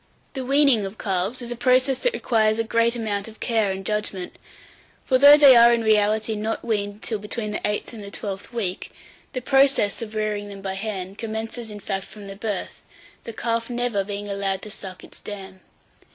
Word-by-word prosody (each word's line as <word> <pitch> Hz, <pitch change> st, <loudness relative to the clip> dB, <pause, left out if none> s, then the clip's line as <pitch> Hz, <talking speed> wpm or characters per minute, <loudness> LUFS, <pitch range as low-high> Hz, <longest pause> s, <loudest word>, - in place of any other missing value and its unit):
850. 265 Hz, -, -4 dB
THE -, -, -6 dB
WEANING 275 Hz, -7 st, +4 dB
OF 195 Hz, +3 st, -10 dB
CALVES 195 Hz, +5 st, -1 dB
is 240 Hz, -, -6 dB
a -, -, -2 dB
process 255 Hz, +2 st, +2 dB
that -, -, 0 dB
requires 220 Hz, -2 st, +2 dB
a 225 Hz, -, +1 dB
great 230 Hz, +1 st, +1 dB
amount 210 Hz, -3 st, -2 dB
of 220 Hz, 0 st, -13 dB
care 220 Hz, -4 st, +1 dB
and 190 Hz, 0 st, -5 dB
judgment; 210 Hz, -3 st, -2 dB, 0.7 s
for 255 Hz, -1 st, +3 dB
though 285 Hz, +2 st, +9 dB
they 280 Hz, -3 st, +8 dB
are 235 Hz, 0 st, +8 dB
in 235 Hz, -1 st, +2 dB
reality 215 Hz, 0 st, +2 dB
not 215 Hz, +2 st, -3 dB
weaned 205 Hz, -2 st, -2 dB
till 220 Hz, -3 st, -2 dB
between 210 Hz, +1 st, -4 dB
the 210 Hz, -, -3 dB
eighth 210 Hz, +3 st, -3 dB
and 215 Hz, -3 st, -8 dB
the 200 Hz, -, -8 dB
twelfth 200 Hz, +1 st, -6 dB
week, 205 Hz, -7 st, -3 dB, 0.4 s
the 255 Hz, -, -3 dB
process 270 Hz, -6 st, +3 dB
of 220 Hz, -1 st, -7 dB
rearing 210 Hz, -1 st, -2 dB
them 200 Hz, -1 st, -10 dB
by 190 Hz, -1 st, -3 dB
hand 195 Hz, -1 st, -5 dB
commences 225 Hz, +1 st, -5 dB
in 210 Hz, -1 st, -8 dB
fact 195 Hz, -1 st, -4 dB
from 210 Hz, -2 st, -11 dB
the 195 Hz, 0 st, -8 dB
birth, 205 Hz, -2 st, -5 dB, 0.4 s
the 230 Hz, -, -5 dB
calf 230 Hz, +1 st, -2 dB
never 240 Hz, -4 st, -1 dB
being 205 Hz, +1 st, -5 dB
allowed 195 Hz, -1 st, -2 dB
to 215 Hz, -, -8 dB
suck 185 Hz, -3 st, -9 dB
its -, -, -14 dB
dam. 190 Hz, -2 st, -9 dB
215 Hz, 205 wpm, -23 LUFS, 200-235 Hz, 0.7 s, though